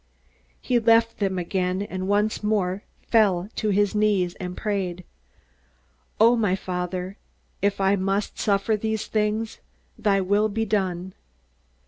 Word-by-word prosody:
He 245 Hz, -1 st, +1 dB
left 230 Hz, 0 st, +3 dB
them 195 Hz, -2 st, 0 dB
again, 180 Hz, +1 st, -1 dB
and 185 Hz, -2 st, -5 dB
once 205 Hz, +2 st, +1 dB
more 200 Hz, -3 st, 0 dB, 0.2 s
he -, -, -33 dB
fell 200 Hz, -4 st, +3 dB
on 215 Hz, -, +2 dB
his 205 Hz, +1 st, +2 dB
knees 205 Hz, -4 st, +2 dB
and 180 Hz, -1 st, -5 dB
prayed, 190 Hz, -4 st, -2 dB, 1.2 s
"O 230 Hz, +3 st, +6 dB
my 210 Hz, -5 st, +1 dB
Father, 180 Hz, +1 st, -4 dB, 0.4 s
if 200 Hz, 0 st, +1 dB
I 195 Hz, +1 st, +3 dB
must 195 Hz, +1 st, -1 dB
suffer 200 Hz, +1 st, +1 dB
these 220 Hz, 0 st, -2 dB
things, 215 Hz, +1 st, -1 dB, 0.4 s
thy 200 Hz, -3 st, +2 dB
will 205 Hz, +3 st, +2 dB
be 225 Hz, +2 st, -1 dB
done." 190 Hz, -3 st, -1 dB
200 Hz, 135 wpm, -24 LUFS, 185-215 Hz, 1.2 s, O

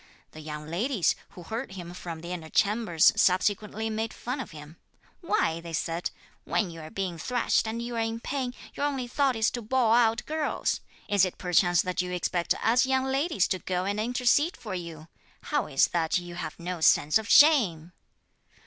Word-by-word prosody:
The 155 Hz, -, -11 dB
young 150 Hz, -1 st, -7 dB
ladies, 185 Hz, -, 0 dB, 0.2 s
who 175 Hz, -, -8 dB
heard 225 Hz, +3 st, -5 dB
him 175 Hz, -2 st, -8 dB
from 170 Hz, -3 st, -7 dB
the 170 Hz, +1 st, -7 dB
inner 165 Hz, -3 st, -6 dB
chambers, 205 Hz, -5 st, +3 dB
subsequently 205 Hz, +3 st, +1 dB
made 220 Hz, 0 st, -3 dB
fun 250 Hz, +3 st, -4 dB
of 265 Hz, -, -5 dB
him. 150 Hz, 0 st, -12 dB, 0.4 s
'Why,' 335 Hz, -, 0 dB
they 165 Hz, -1 st, -8 dB
said, 165 Hz, +2 st, -2 dB, 0.3 s
'when 195 Hz, -5 st, -1 dB
you 165 Hz, -1 st, -9 dB
are 155 Hz, -, -9 dB
being 180 Hz, -3 st, -4 dB
thrashed, 245 Hz, +3 st, +1 dB
and 225 Hz, +1 st, -3 dB
you 240 Hz, 0 st, -5 dB
are -, -, -1 dB
in 225 Hz, 0 st, -2 dB
pain, 255 Hz, 0 st, -3 dB, 0.2 s
your 290 Hz, -, -1 dB
only 265 Hz, -4 st, -3 dB
thought 270 Hz, +1 st, +1 dB
is 220 Hz, 0 st, +2 dB
to 240 Hz, -, -4 dB
bawl 230 Hz, 0 st, +2 dB
out 230 Hz, -1 st, +3 dB
girls! 310 Hz, -1 st, -1 dB, 0.3 s
Is 200 Hz, -2 st, +3 dB
it 185 Hz, -, -1 dB
perchance 175 Hz, -1 st, +3 dB
that 180 Hz, -1 st, -1 dB
you 180 Hz, 0 st, -5 dB
expect 175 Hz, -1 st, 0 dB
us 240 Hz, +3 st, +4 dB
young 265 Hz, 0 st, +2 dB
ladies 265 Hz, -, +1 dB
to 185 Hz, -, -1 dB
go 180 Hz, 0 st, -2 dB
and 205 Hz, +1 st, -1 dB
intercede 250 Hz, -, +2 dB
for 210 Hz, -5 st, -7 dB
you? 165 Hz, -3 st, -7 dB, 0.4 s
How 295 Hz, -3 st, -1 dB
is 135 Hz, -2 st, +3 dB
that 165 Hz, -1 st, +1 dB
you 175 Hz, -1 st, -6 dB
have 175 Hz, -, -6 dB
no 175 Hz, 0 st, -5 dB
sense 155 Hz, +4 st, +4 dB
of 220 Hz, -, -8 dB
shame?' 190 Hz, -, +5 dB
200 Hz, 195 wpm, -27 LUFS, 170-240 Hz, 0.4 s, shame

